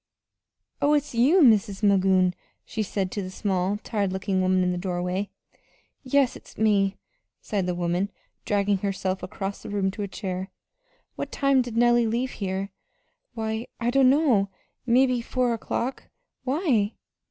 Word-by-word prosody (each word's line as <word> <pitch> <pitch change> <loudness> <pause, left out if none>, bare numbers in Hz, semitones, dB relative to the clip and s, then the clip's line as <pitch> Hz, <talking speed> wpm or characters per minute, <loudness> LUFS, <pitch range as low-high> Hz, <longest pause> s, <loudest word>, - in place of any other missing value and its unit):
"Oh, 290 +1 +4
it's 295 -2 0
you, 285 +10 +5
Mis' 215 -4 +3
Magoon," 190 -2 +4 0.3
she 220 - -3
said 195 -2 -2
to 205 - -3
the 185 - -5
small, 190 0 -1
tired 200 -4 -1
looking 190 0 -1
woman 185 0 +2
in 180 - +1
the 180 - -2
doorway. 180 +1 -2 0.7
"Yes, 270 -1 +2
it's - - -14
me," 200 -3 +2 0.4
sighed 195 -4 -2
the 180 - -1
woman, 175 +3 0 0.3
dragging 200 -1 +1
herself 190 -1 -2
across 195 +2 -5
the - - -8
room 200 -2 0
to 205 - -7
a 200 - -2
chair. 190 -1 -5 0.7
"What - - -4
time 275 -1 +3
did 240 -2 -5
Nellie 240 0 +4
leave 240 +4 -1
here?" 195 0 -3 0.6
"Why, 220 +1 -3
I 240 0 0
dunno 265 -5 +4 0.4
mebbe 250 0 +3
four 250 0 0
o'clock. 235 +3 -3 0.4
Why?" 255 - +1
205 Hz, 150 wpm, -25 LUFS, 190-240 Hz, 0.7 s, you